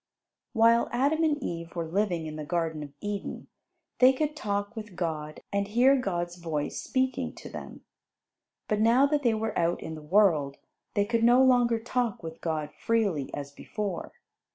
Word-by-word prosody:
While 230 0 +4
Adam 285 +6 +2
and 305 -2 +2
Eve 170 0 -5
were 170 -1 -2
living 175 -1 0
in 155 -1 -6
the 155 - -5
Garden 160 -1 -2
of 145 -1 -7
Eden, 205 -1 -4 0.5
they 255 +1 +7
could 300 +2 -1
talk 205 -4 -2
with 210 -4 -8
God 155 -3 -4
and 200 0 0
hear 245 +6 +5
God's 175 -8 -2
voice 160 -4 -3
speaking 260 0 -1
to - - -10
them. - - -9 0.8
But 210 - 0
now 235 +5 +5
that 290 0 +1
they 235 -5 +2
were 220 0 -2
out 170 +1 +1
in 160 - -5
the 155 - -8
world, 150 -5 +3 0.4
they 205 -1 +3
could 230 +1 0
no 245 +2 +6
longer 245 -3 +4
talk 240 -2 -2
with 160 0 -8
God 155 -3 -2
freely, 200 -12 0
as 140 -1 -6
before. 200 +5 -5
205 Hz, 175 wpm, -28 LUFS, 165-235 Hz, 0.8 s, they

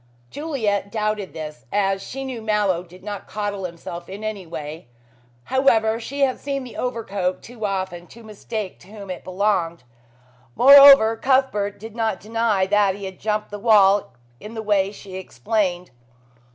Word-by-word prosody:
Juliet 220 -10 -2
doubted 215 -3 -2
this, 150 -5 -8
as 195 -1 +1
she 270 +6 -6
knew 255 -4 -5
Mallow 210 -5 +1
did 180 +1 -16
not 205 -1 -6
coddle 205 -2 -3
himself 170 0 -8
in 200 +3 -8
any 210 -5 -5
way. 150 -3 -7 0.6
However, 225 - +2
she 280 +5 -5
had 265 -2 +2
seen 275 -1 -3
the 250 - -10
overcoat 200 -7 -2
too 225 -3 -5
often 185 -3 -4
to 235 - -14
mistake 215 -1 -6
to - - -18
whom 200 -2 -9
it 180 - -7
belonged. 185 -4 -1 0.7
Moreover, 275 -4 +9
Cuthbert 240 -6 +1
did 220 +1 -10
not 220 -5 -1
deny 220 -2 0
that 200 -1 +2
he 200 0 -7
had 190 -1 -8
jumped 210 0 -2
the 205 - -6
wall 200 - +4 0.2
in 215 +2 -10
the 220 - -4
way 200 -2 +1
she 195 -2 -10
explained. 190 -2 -2
205 Hz, 160 wpm, -22 LUFS, 190-225 Hz, 0.7 s, Moreover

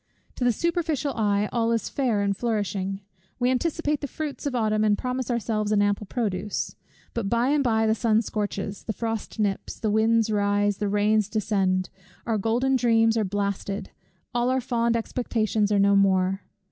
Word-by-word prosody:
To - - -4
the 245 - +4
superficial 320 -1 -1
eye, 205 -2 +1
all 230 -1 +1
is 230 -1 0
fair 235 -7 0
and 200 0 +1
flourishing; 200 -3 -2 0.4
we 245 +1 +2
anticipate 300 +2 0
the 285 - -3
fruits 295 +1 -5
of 265 - -2
Autumn, 215 -2 +1
and 210 -1 +3
promise 255 0 -3
ourselves 215 -3 -1
an 205 -1 +4
ample 205 0 0
produce. 210 -3 -2 0.4
But 225 -4 -2
by 235 +3 +2
and 290 -1 +2
by 225 -3 +2
the 220 - +3
sun 225 0 +2
scorches, 205 -1 -3
the 220 - -2
frost 225 0 -4
nips, 200 -2 -2
the 215 - 0
winds 220 +1 +3
rise, 205 -1 +1
the 205 -1 -1
rains 210 0 +2
descend; 195 -4 0 0.3
our 225 -3 0
golden 245 +6 +1
dreams 225 -2 +3
are 225 - +2
blasted, 200 0 -3 0.4
all 240 +1 +1
our 260 0 +2
fond 235 -1 +1
expectations 220 -3 -1
are 205 - +3
no 200 0 +4
more. 190 -1 +3
220 Hz, 175 wpm, -25 LUFS, 205-240 Hz, 0.4 s, the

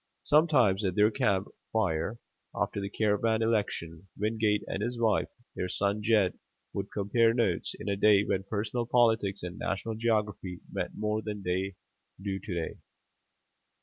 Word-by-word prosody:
Sometimes 140 - +4
at 95 -2 0
their 105 +1 +5
camp 100 -2 +1 0.2
fire, 95 -1 0 0.4
after 100 - -1
the 100 - -3
caravan 110 +2 +1
election, 95 -6 -1
Wingate 105 0 +1
and 95 - -4
his 120 +2 -2
wife, 110 -4 +2 0.3
their 90 - -2
son 100 +3 0
Jed, 105 -4 +2 0.3
would 100 0 -3
compare 115 +3 +2
notes, 100 -9 0
in - - -7
a 100 - +1
day 100 0 +5
when 95 - 0
personal 110 +4 -2
politics 110 -6 +2
and 90 0 -6
national 110 +3 -2
geography 105 -5 -1
meant - - -3
more 105 +1 0
than 105 -2 -5
they 95 +1 -1 0.4
do 95 0 -3
to 95 - -8
day. 85 -1 -3
105 Hz, 150 wpm, -29 LUFS, 95-110 Hz, 0.4 s, their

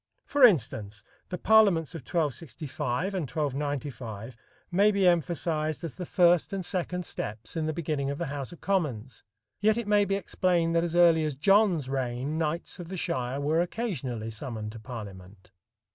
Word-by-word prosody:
For 285 -2 +1
instance, 110 - +3 0.3
the 180 - -3
parliaments 195 -7 +4
of 165 - -6
1265 150 - -2
and 170 -8 -2
1295 135 -6 -3 0.4
may 200 +4 +5
be 200 -3 +3
emphasized 165 -2 0
as 165 - -4
the 180 -2 -7
first 175 -2 +4
and 195 -2 -3
second 180 0 -2
steps 110 0 -6
in 160 -1 -1
the - - 0
beginning 150 -4 -2
of 140 - -3
the 170 - -2
House 140 -2 -5
of 175 - -13
Commons, 135 - -2 0.4
yet 215 +1 +3
it 235 -3 -3
may 205 -1 +4
be 195 - 0
explained 175 -3 +1
that 165 - +3
as 170 -1 -2
early 170 -2 +6
as 150 -3 -2
John's 185 -1 +3
reign 135 +3 -2
knights 165 +3 -2
of 175 - -7
the 190 +2 -6
shire 135 -7 -2
were 155 +4 +2
occasionally 135 - -3
summoned 110 -2 -6
to 115 - -9
parliament. 100 -5 -10
155 Hz, 170 wpm, -28 LUFS, 125-180 Hz, 0.4 s, early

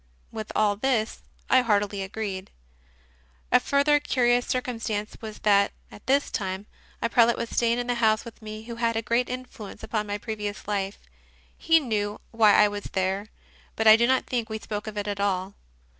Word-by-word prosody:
With 220 -1 -6
all 205 -1 +2
this 230 -2 0 0.3
I 260 - +5
heartily 205 -3 +1
agreed. 195 -1 -5 1.0
A - - +7
further 290 +1 +3
curious 245 -3 +2
circumstance 230 -4 -2
was 215 -1 -7
that, 200 -1 +4 0.2
at 205 - -14
this 280 +2 +2
time, 190 0 -3 0.4
a - - +3
prelate 235 0 +4
was 230 - -4
staying 235 0 +2
in 245 - -2
the 245 - 0
house 220 -2 +2
with 230 -1 -11
me 215 0 -7
who 230 0 -8
had 230 0 +1
had 230 - -1
a 225 - 0
great 235 +3 +1
influence 250 -4 -8
upon 210 -2 -2
my 205 0 -2
previous 210 -2 -5
life. 200 -1 -2 0.6
He 325 0 +4
knew 210 -6 -2
why 220 -3 +5
I 210 - +6
was 205 0 -5
there, 190 +2 -1 0.5
but 220 - -1
I 215 0 +10
do 235 +1 +3
not 260 0 +2
think 235 -3 -2
we 220 - -3
spoke 210 0 -6
of 215 -1 -6
it 205 0 -2
at 205 -1 -3
all. 195 -1 -1
220 Hz, 190 wpm, -26 LUFS, 205-235 Hz, 1.0 s, I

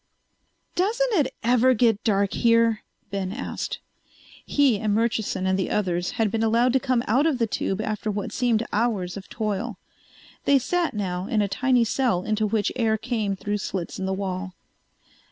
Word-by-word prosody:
"Doesn't 460 +6 +1
it 300 -9 +1
ever 250 +2 +4
get 225 -2 +2
dark 200 -3 +1
here?" 230 -2 +3 0.3
Ben 195 -2 -2
asked. 245 +7 -4 0.7
He 275 -7 +2
and 210 -1 0
Murchison 220 -4 0
and 190 0 +1
the 190 - -1
others 180 -3 -1
had 220 -3 +1
been 225 - -1
allowed 230 +3 +3
to 265 - +4
come 255 -3 0
out 265 +8 +3
of 300 -5 +1
the 235 - +2
tube 195 -2 -2
after 215 0 -2
what 205 -1 -3
seemed 235 -3 +1
hours 205 -5 0
of 200 -1 -9
toil. 215 0 -3 0.7
They 280 - +5
sat 335 +3 0
now 185 -2 -2
in 215 -2 +1
a - - 0
tiny 250 +4 +2
cell 230 -5 +1
into 215 +1 0
which 210 -1 0
air 225 -3 +1
came 220 -4 -2
through 205 +2 -3
slits 185 -3 -4
in 190 - -2
the - - -1
wall. 190 -1 -4
220 Hz, 175 wpm, -24 LUFS, 200-245 Hz, 0.7 s, They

